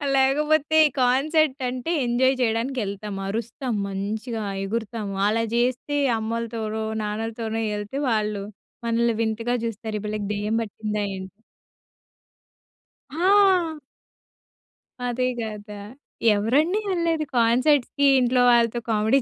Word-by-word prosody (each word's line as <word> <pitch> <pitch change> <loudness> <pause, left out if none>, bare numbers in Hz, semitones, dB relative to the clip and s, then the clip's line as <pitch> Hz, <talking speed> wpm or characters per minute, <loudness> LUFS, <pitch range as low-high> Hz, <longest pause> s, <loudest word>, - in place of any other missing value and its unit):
లేకపోతే 300 +3 +3 0.2
కాన్సర్ట్ 280 +3 +2
అంటే 255 +6 -4
ఎంజాయ్ 255 +2 +2
చేయడానికి 240 +3 0
యెళ్తాం. 200 +1 -5
అరుస్తాం 235 +4 -3
మంచిగా, 215 +4 -4 0.2
ఎగురుతాము. 215 0 -3
అలా 225 +2 +1
జేస్తే 250 +4 0 0.2
అమ్మలతోనో, 220 -1 -3 0.2
నాన్నలతోనో 225 +1 -3
యెళ్తే 210 +6 -4
వాళ్ళు 210 -3 0 0.4
మనల్ని 235 0 +2
వింతగా 230 +2 -1
జూస్తారు 220 -1 -4
ఈ - - -11
పిల్లకి 210 -1 -3
దెయ్యం 210 +2 -1
పట్టిందా 210 -1 -3
ఏంటి? 190 +1 -9 1.8
హా! 370 -2 +4 1.3
అదే 250 +1 0
గదా! 210 -2 -6 0.5
ఎవరండి 285 - +2
యెళ్లేది 335 -4 0
కాన్సర్ట్స్‌కీ 255 +4 +3
ఇంట్లో 250 0 +2
వాళ్ళతో? 235 0 +3
కామెడీ 220 +4 +3
230 Hz, 100 wpm, -24 LUFS, 215-265 Hz, 1.8 s, హా